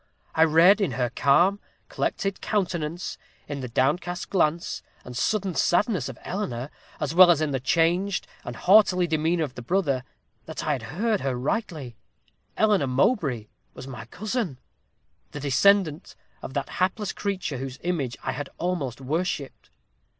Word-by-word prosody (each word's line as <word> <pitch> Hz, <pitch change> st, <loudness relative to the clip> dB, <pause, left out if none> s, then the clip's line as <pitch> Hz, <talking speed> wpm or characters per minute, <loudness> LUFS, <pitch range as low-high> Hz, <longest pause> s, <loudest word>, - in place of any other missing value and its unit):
I 160 Hz, -, +5 dB
read 170 Hz, +7 st, +6 dB
in 185 Hz, -10 st, 0 dB
her 125 Hz, 0 st, -1 dB
calm, 175 Hz, +9 st, +3 dB, 0.3 s
collected 195 Hz, -1 st, -2 dB
countenance 175 Hz, -5 st, -2 dB, 0.3 s
in 145 Hz, -, -4 dB
the 130 Hz, -, -4 dB
downcast 150 Hz, +9 st, -1 dB
glance, 170 Hz, -3 st, +1 dB, 0.2 s
and 125 Hz, -, -8 dB
sudden 195 Hz, -, 0 dB
sadness 180 Hz, -, +1 dB
of -, -, -8 dB
Eleanor, 140 Hz, -, -4 dB, 0.3 s
as 150 Hz, +1 st, -2 dB
well 180 Hz, +1 st, +8 dB
as 170 Hz, -4 st, +5 dB
in 155 Hz, -2 st, 0 dB
the 135 Hz, -, 0 dB
changed 170 Hz, +8 st, +1 dB, 0.2 s
and 120 Hz, -, -6 dB
haughty 185 Hz, -, +5 dB
demeanor 160 Hz, +1 st, +1 dB
of 140 Hz, -4 st, -4 dB
the 125 Hz, -, -8 dB
brother, 140 Hz, -3 st, 0 dB, 0.4 s
that 160 Hz, -, -5 dB
I 155 Hz, -, +1 dB
had 135 Hz, -4 st, -1 dB, 0.2 s
heard 220 Hz, 0 st, +1 dB
her 135 Hz, -2 st, -1 dB
rightly. 140 Hz, -, -3 dB, 0.6 s
Eleanor 210 Hz, -9 st, +3 dB
Mowbray 130 Hz, -, +1 dB, 0.3 s
was 130 Hz, -, -8 dB
my 120 Hz, -4 st, -8 dB
cousin 205 Hz, -, -3 dB, 0.8 s
the 145 Hz, -, -5 dB
descendant 160 Hz, +4 st, +2 dB, 0.3 s
of 130 Hz, -, -8 dB
that 140 Hz, -, -2 dB
hapless 190 Hz, +2 st, 0 dB
creature 190 Hz, -8 st, -3 dB
whose 130 Hz, 0 st, -6 dB
image 155 Hz, -9 st, -2 dB
I -, -, -1 dB
had 145 Hz, -1 st, -5 dB
almost 150 Hz, -9 st, -2 dB
worshipped. 150 Hz, 0 st, -3 dB
160 Hz, 150 wpm, -25 LUFS, 135-185 Hz, 0.8 s, well